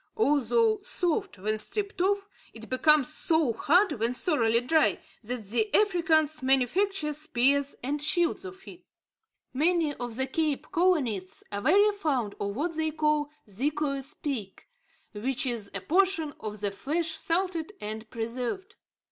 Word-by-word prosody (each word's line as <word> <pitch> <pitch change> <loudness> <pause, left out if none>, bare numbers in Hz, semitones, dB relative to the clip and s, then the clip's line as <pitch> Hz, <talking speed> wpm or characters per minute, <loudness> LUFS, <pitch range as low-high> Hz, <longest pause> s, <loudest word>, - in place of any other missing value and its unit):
Although 435 - +3
soft 375 - -1
when 215 +3 -2
stripped 400 - -2
off, 400 +1 +1 0.3
it 225 +1 -11
becomes 300 +2 +4
so 320 -7 +1
hard, 355 - +3
when 235 +3 0
thoroughly 235 - +2
dry, 310 +6 +2 0.2
that 240 -1 -5
the 245 - 0
Africans 330 -7 +2
manufacture 300 - +1
spears 280 -1 +1
and 285 +3 -2
shields 340 +4 +2
of 380 0 -10
it. 360 0 -12 0.7
Many 320 +2 +2
of 245 -4 -6
the 265 +2 0
Cape 300 +1 -2
colonists 255 - +1
are 205 0 -3
very 405 - +5
fond 275 - -1
of 200 0 -3
what 325 +5 -2
they 315 0 0
call 300 -1 0 0.2
"zeekoe 275 +6 -2
speek," 270 -7 -6 0.5
which 250 +6 -1
is 230 -5 -2
a 195 - -3
portion 335 - +1
of 210 -1 -6
the 205 -1 -1
flesh 320 +10 -2
salted 335 +1 -1
and 215 +1 -6
preserved. 250 - -4
295 Hz, 140 wpm, -28 LUFS, 240-345 Hz, 0.7 s, very